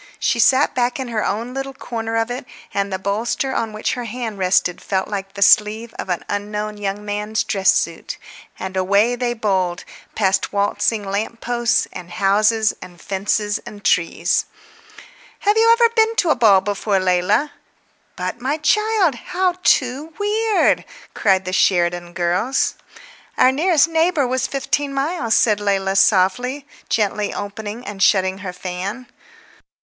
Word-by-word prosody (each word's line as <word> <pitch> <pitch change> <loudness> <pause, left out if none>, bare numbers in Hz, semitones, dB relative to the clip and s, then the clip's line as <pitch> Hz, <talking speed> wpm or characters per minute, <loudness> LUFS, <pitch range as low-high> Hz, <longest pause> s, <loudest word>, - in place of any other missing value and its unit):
She 235 - 0
sat 265 +4 +4
back 245 +1 0
in 260 -2 -4
her 220 -2 -1
own 230 +4 -2
little 270 0 -5
corner 225 -3 -4
of 225 +1 0
it, 250 +1 -6 0.3
and 200 0 -1
the 190 - -1
bolster 220 +7 -2
on 225 -3 -2
which 215 0 -2
her 245 -1 -4
hand 225 -2 -5
rested 180 -1 +1
felt 190 -1 -1
like 195 -1 -5
the 200 - +2
sleeve 215 +3 +3
of - - -5
an 180 - -2
unknown 210 +1 -4
young 205 +1 -4
man's 210 +1 -2
dress 195 -2 +2
suit; - - -2 0.4
and 190 0 -6
away 200 +6 +2
they 240 0 -2
bowled, 190 -5 -1 0.3
past 195 -3 +1
waltzing 205 +2 0
lamp 205 +4 -3
posts 240 -1 0
and 175 -1 -9
houses 215 +3 +2
and 175 -1 -12
fences 205 +1 -1
and 205 -1 -12
trees. 170 0 +1 1.0
"Have 415 +1 +2
you 445 +1 +4
really 460 0 +6
never 465 -1 +4
been 450 0 +2
to 355 - +2
a - - +3
ball 200 -5 +5
before, 200 0 -1
Leila? 185 +10 +1 0.6
But, 185 +6 -4
my 275 +4 -1
child, 410 +1 +2
how 365 +8 -1
too 275 +5 +1
weird—" 425 +1 +1 0.3
cried 190 -3 +2
the 185 - -4
Sheridan 175 -2 +1
girls. 180 +9 0 0.6
"Our 255 - +5
nearest 325 +3 +3
neighbour 325 -2 +1
was 255 +1 -1
fifteen 275 0 -2
miles," 275 -5 0
said 210 -3 +3
Leila 195 -1 0
softly, 245 +9 +2 0.2
gently 210 -1 0
opening 210 +3 -6
and 200 -2 -7
shutting 190 -1 +3
her 190 -2 -5
fan. 185 +7 -5
215 Hz, 155 wpm, -20 LUFS, 195-255 Hz, 1.0 s, really